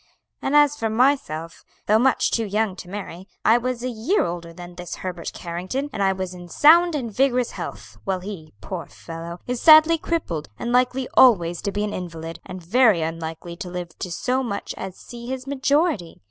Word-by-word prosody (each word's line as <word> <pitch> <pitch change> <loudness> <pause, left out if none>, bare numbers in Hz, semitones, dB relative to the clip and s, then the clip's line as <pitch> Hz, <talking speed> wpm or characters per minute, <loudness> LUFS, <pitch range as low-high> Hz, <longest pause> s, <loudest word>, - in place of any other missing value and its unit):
And 275 - 0
as 295 -1 +5
for 225 -6 -2
myself, 220 - 0 0.2
though 215 +1 +4
much 260 +2 +2
too 230 - +1
young 210 -1 0
to 180 - -9
marry, 190 -2 -7 0.2
I 225 +2 +6
was 250 0 -3
a - - -1
year 245 - +1
older 170 -1 -5
than 175 +1 -10
this 175 0 -7
Herbert 175 -2 -4
Carrington; 185 +12 -4
and 210 - -3
I 195 -1 +4
was 185 -1 -4
in 175 -1 -11
sound 335 - +6
and 245 -6 -3
vigorous 250 0 +2
health, - - -8
while 190 -2 -2
he, 180 -5 -8
poor - - -6
fellow, 165 - -8
is 250 -1 -3
sadly 315 +1 +7
crippled, 170 - -3
and 240 - -3
likely 250 +1 +2
always 175 -9 +5
to 200 - -2
be 205 +1 -2
an 210 0 -2
invalid, 165 -2 -6
and 180 -1 -8
very 215 -3 +4
unlikely 165 +1 -5
to 180 - -6
live 175 -1 -5
to 180 - -4
so 255 +9 0
much 230 -6 -4
as 190 -1 -7
see 240 0 -10
his 260 0 -4
majority. 280 - 0
205 Hz, 195 wpm, -23 LUFS, 175-255 Hz, 0.2 s, sadly